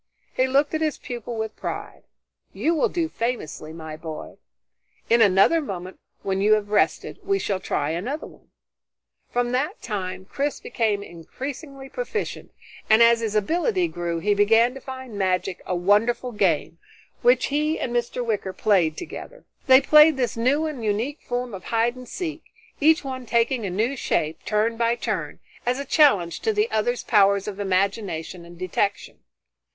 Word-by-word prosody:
He 255 Hz, -, +2 dB
looked 280 Hz, +3 st, +2 dB
at 315 Hz, -, -1 dB
his 310 Hz, -3 st, 0 dB
pupil 240 Hz, -1 st, -6 dB
with 220 Hz, -1 st, -4 dB
pride. -, -, -6 dB, 0.5 s
"You 330 Hz, -, +1 dB
will 315 Hz, -, +2 dB
do 335 Hz, -2 st, -1 dB
famously, 230 Hz, -, -4 dB
my 160 Hz, -1 st, -8 dB
boy. 160 Hz, -1 st, -8 dB, 0.7 s
In 235 Hz, 0 st, +5 dB
another 205 Hz, -, +5 dB
moment, 185 Hz, -, -6 dB, 0.2 s
when 195 Hz, 0 st, -1 dB
you 210 Hz, +2 st, +5 dB
have 210 Hz, -1 st, 0 dB
rested, 210 Hz, -, +1 dB
we 395 Hz, 0 st, 0 dB
shall 200 Hz, -, -2 dB
try 150 Hz, -4 st, -1 dB
another 245 Hz, -, -3 dB
one." -, -, -17 dB, 0.8 s
From 245 Hz, 0 st, 0 dB
that 295 Hz, -, -1 dB
time, 185 Hz, -2 st, -4 dB
Chris 280 Hz, +8 st, -2 dB
became 210 Hz, -4 st, -1 dB
increasingly 270 Hz, -, -8 dB
proficient, 455 Hz, -, -4 dB, 0.4 s
and 220 Hz, +2 st, +7 dB
as 235 Hz, 0 st, +5 dB
his 220 Hz, -2 st, -3 dB
ability 350 Hz, -, +1 dB
grew 170 Hz, -, -3 dB
he 205 Hz, +5 st, +1 dB
began 225 Hz, +4 st, +4 dB
to 270 Hz, -, -9 dB
find 260 Hz, -5 st, -8 dB
magic 185 Hz, 0 st, 0 dB
a 180 Hz, -, -1 dB
wonderful 210 Hz, +7 st, +2 dB
game, 170 Hz, -6 st, 0 dB, 0.4 s
which -, -, +4 dB
he 305 Hz, +2 st, +1 dB
and 240 Hz, -, -3 dB
Mr. 240 Hz, +1 st, -1 dB
Wicker 205 Hz, -4 st, -2 dB
played 185 Hz, -8 st, +2 dB
together. -, -, -9 dB, 0.2 s
They 260 Hz, 0 st, +8 dB
played 300 Hz, +1 st, +6 dB
this 245 Hz, -4 st, -1 dB
new 265 Hz, +7 st, +2 dB
and 295 Hz, -7 st, -5 dB
unique 220 Hz, +8 st, -1 dB
form 245 Hz, -1 st, -3 dB
of 185 Hz, -2 st, -8 dB
hide 230 Hz, +1 st, +1 dB
and 255 Hz, -1 st, -11 dB
seek, 325 Hz, -3 st, -5 dB, 0.3 s
each 320 Hz, +3 st, +4 dB
one 260 Hz, -2 st, -6 dB
taking 235 Hz, -1 st, +1 dB
a -, -, -2 dB
new 220 Hz, +9 st, 0 dB
shape, 155 Hz, -, -2 dB
turn 220 Hz, +2 st, +1 dB
by 235 Hz, 0 st, +2 dB
turn, 240 Hz, -, -4 dB, 0.2 s
as 245 Hz, +1 st, 0 dB
a 280 Hz, -, -4 dB
challenge 210 Hz, -, +3 dB
to 445 Hz, -, 0 dB
the 425 Hz, +2 st, +1 dB
other's 240 Hz, +3 st, 0 dB
powers 200 Hz, -2 st, +3 dB
of 205 Hz, -1 st, -5 dB
imagination 190 Hz, -3 st, -1 dB
and 170 Hz, 0 st, -13 dB
detection. 185 Hz, +3 st, -2 dB
230 Hz, 165 wpm, -24 LUFS, 195-270 Hz, 0.8 s, They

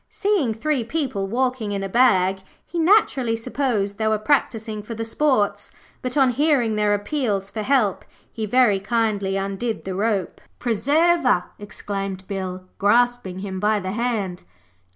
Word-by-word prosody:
Seeing 385 Hz, -, 0 dB
three 280 Hz, +2 st, 0 dB
people 235 Hz, -7 st, -2 dB
walking 245 Hz, -1 st, -1 dB
in 195 Hz, -1 st, -2 dB
a -, -, -2 dB
bag 190 Hz, -4 st, +3 dB, 0.3 s
he 345 Hz, -, -4 dB
naturally 320 Hz, -, +3 dB
supposed 225 Hz, -4 st, -2 dB
they 220 Hz, -, +1 dB
were 215 Hz, 0 st, +2 dB
practising 220 Hz, -3 st, 0 dB
for 225 Hz, +2 st, -7 dB
the 225 Hz, +1 st, -4 dB
sports, 225 Hz, -5 st, 0 dB, 0.3 s
but 255 Hz, +3 st, -3 dB
on 265 Hz, -2 st, +5 dB
hearing 260 Hz, -5 st, +2 dB
their 210 Hz, -1 st, +2 dB
appeals 205 Hz, -4 st, -2 dB
for 220 Hz, -, -4 dB
help 220 Hz, -5 st, +1 dB, 0.3 s
he 220 Hz, -1 st, -4 dB
very 235 Hz, -3 st, +4 dB
kindly 200 Hz, -2 st, 0 dB
undid 195 Hz, +4 st, -3 dB
the 190 Hz, -, -3 dB
rope. 200 Hz, -2 st, -1 dB, 0.2 s
'Preserver,' 260 Hz, -, +2 dB, 0.2 s
exclaimed 195 Hz, -2 st, -5 dB
Bill, 185 Hz, -2 st, -5 dB
grasping 235 Hz, -2 st, +2 dB
him 190 Hz, -1 st, -4 dB
by 210 Hz, +1 st, +2 dB
the 185 Hz, -1 st, -4 dB
hand. 215 Hz, -5 st, -2 dB
220 Hz, 150 wpm, -22 LUFS, 200-255 Hz, 0.3 s, on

